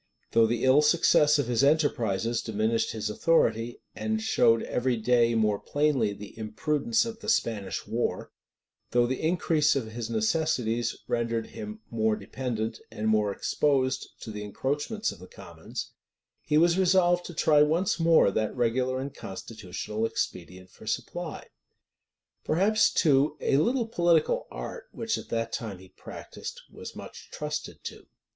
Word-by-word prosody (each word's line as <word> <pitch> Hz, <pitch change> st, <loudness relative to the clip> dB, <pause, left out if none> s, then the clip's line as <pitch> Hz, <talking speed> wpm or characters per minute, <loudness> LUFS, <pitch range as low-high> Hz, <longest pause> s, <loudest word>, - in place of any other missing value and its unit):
Though 115 Hz, -1 st, +5 dB
the 120 Hz, +1 st, -1 dB
ill 130 Hz, +3 st, +6 dB
success 150 Hz, -1 st, +4 dB
of 145 Hz, -, 0 dB
his 120 Hz, +2 st, +1 dB
enterprises 120 Hz, -7 st, +1 dB
diminished 110 Hz, +1 st, 0 dB
his 110 Hz, -1 st, -3 dB
authority, 115 Hz, -2 st, +1 dB
and 220 Hz, 0 st, -1 dB
showed 115 Hz, -, +3 dB
every 125 Hz, -1 st, 0 dB
day 120 Hz, 0 st, +3 dB
more 105 Hz, -2 st, +2 dB
plainly 145 Hz, -7 st, +1 dB
the 100 Hz, 0 st, -10 dB
imprudence 150 Hz, -, 0 dB
of 225 Hz, -1 st, -6 dB
the -, -, -5 dB
Spanish 110 Hz, -, -1 dB
war; -, -, -2 dB, 0.6 s
though 120 Hz, 0 st, +3 dB
the 130 Hz, +2 st, -2 dB
increase 160 Hz, -2 st, +2 dB
of 115 Hz, -5 st, -2 dB
his 115 Hz, 0 st, -5 dB
necessities 115 Hz, 0 st, 0 dB
rendered 115 Hz, -1 st, -1 dB
him 215 Hz, 0 st, -7 dB
more 110 Hz, -1 st, +1 dB
dependent, 115 Hz, +1 st, -4 dB
and 110 Hz, +1 st, -2 dB
more 105 Hz, -2 st, +2 dB
exposed 130 Hz, +5 st, 0 dB
to 110 Hz, -, -7 dB
the 105 Hz, -1 st, -6 dB
encroachments 145 Hz, -, -2 dB
of -, -, -12 dB
the -, -, -12 dB
commons, -, -, -8 dB, 0.5 s
he 150 Hz, -, +1 dB
was 170 Hz, +3 st, +4 dB
resolved 175 Hz, -1 st, +3 dB
to 175 Hz, -, -9 dB
try 150 Hz, -1 st, +4 dB
once 165 Hz, +5 st, +2 dB
more 165 Hz, -10 st, +5 dB
that 110 Hz, +2 st, -1 dB
regular 125 Hz, +2 st, 0 dB
and 140 Hz, +1 st, -5 dB
constitutional 105 Hz, -1 st, -6 dB
expedient 90 Hz, -2 st, -5 dB
for -, -, -15 dB
supply. -, -, -4 dB, 1.0 s
Perhaps, 200 Hz, +7 st, +3 dB
too, 145 Hz, -2 st, +3 dB
a 135 Hz, -, +2 dB
little 235 Hz, -, +2 dB
political 175 Hz, -, +2 dB
art, 480 Hz, -, -7 dB
which 225 Hz, -1 st, -2 dB
at -, -, -11 dB
that 115 Hz, 0 st, -2 dB
time 110 Hz, -5 st, -4 dB
he 95 Hz, +1 st, -15 dB
practised, -, -, -9 dB
was -, -, -9 dB
much -, -, -10 dB
trusted -, -, -5 dB
to. -, -, -8 dB
125 Hz, 150 wpm, -27 LUFS, 110-160 Hz, 1.0 s, ill